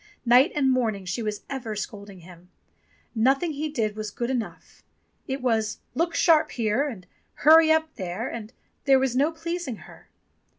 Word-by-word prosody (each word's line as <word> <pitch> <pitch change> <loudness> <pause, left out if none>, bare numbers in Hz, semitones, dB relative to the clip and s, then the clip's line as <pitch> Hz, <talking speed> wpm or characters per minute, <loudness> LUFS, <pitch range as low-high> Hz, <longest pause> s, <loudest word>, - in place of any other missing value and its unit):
Night 250 +7 +5
and 270 -3 +2
morn 240 -5 +1
ing 195 -1 -10
she 180 +6 -3
was 210 -1 -2
for - - -26
ever 240 -5 -4
scolding 200 -2 -7
him. 175 +1 -15 0.6
Nothing 270 +8 +2
he 305 +2 -3
did 220 -7 -2
was 215 0 -4
good 235 +4 -3
enough. 245 -4 -6 0.5
It 265 -1 -4
was 220 -3 0 0.2
"Look 335 +1 -1
sharp 320 -3 +4
here" 235 +4 0
and 210 -10 -8 0.4
"Hurry 320 +1 +8
up 315 0 +1
there," 185 +4 -4
and 225 -1 -7 0.3
there 270 -1 +6
was 260 -2 0
no 285 +5 +2
pleasing 335 -4 -4
her. - - -16
250 Hz, 175 wpm, -25 LUFS, 215-300 Hz, 0.6 s, Hurry